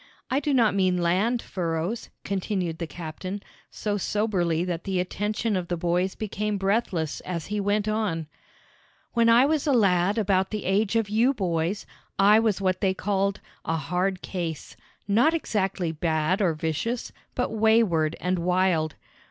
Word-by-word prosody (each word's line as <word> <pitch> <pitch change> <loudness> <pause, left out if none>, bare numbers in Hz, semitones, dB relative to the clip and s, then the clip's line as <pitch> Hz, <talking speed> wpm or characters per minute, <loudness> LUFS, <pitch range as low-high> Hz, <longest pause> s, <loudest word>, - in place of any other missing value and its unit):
I 265 - +3
do 290 +1 -1
not 235 -5 +4
mean 185 -2 +2
land 190 +8 +1
furrows," 170 +4 -3
continued 190 -4 -2
the 170 - -3
captain, 175 +5 -6 0.3
so 205 -1 -2
soberly 185 -5 0
that 175 -2 -3
the 190 -2 -1
attention 210 +4 -1
of 180 -2 -2
the 175 - -2
boys 175 +3 0
became 210 0 -2
breathless 195 -6 0
as 170 -3 -5
he 210 +1 -2
went 205 +1 0
on: 210 -7 -1 0.9
"When 230 -1 +4
I 235 +3 +7
was 305 0 0
a - - +4
lad 195 -3 +3
about 190 -3 +2
the 215 -2 -4
age 200 +3 +1
of 225 -2 +2
you 230 +6 +2
boys, 175 -1 -1 0.3
I 205 +3 +6
was 220 -4 +1
what 185 -1 0
they 190 -1 +2
call 200 0 0 0.3
a 160 - -1
'hard 180 +5 -1
case,' 170 -5 -5 0.3
not 240 +11 +4
exactly 195 - -1
bad 160 +3 0
or 175 -5 +2
vicious, 160 +10 -2 0.2
but 250 - -1
wayward 215 -8 +3
and 180 0 0
wild. 175 -3 +1
195 Hz, 160 wpm, -26 LUFS, 175-215 Hz, 0.9 s, I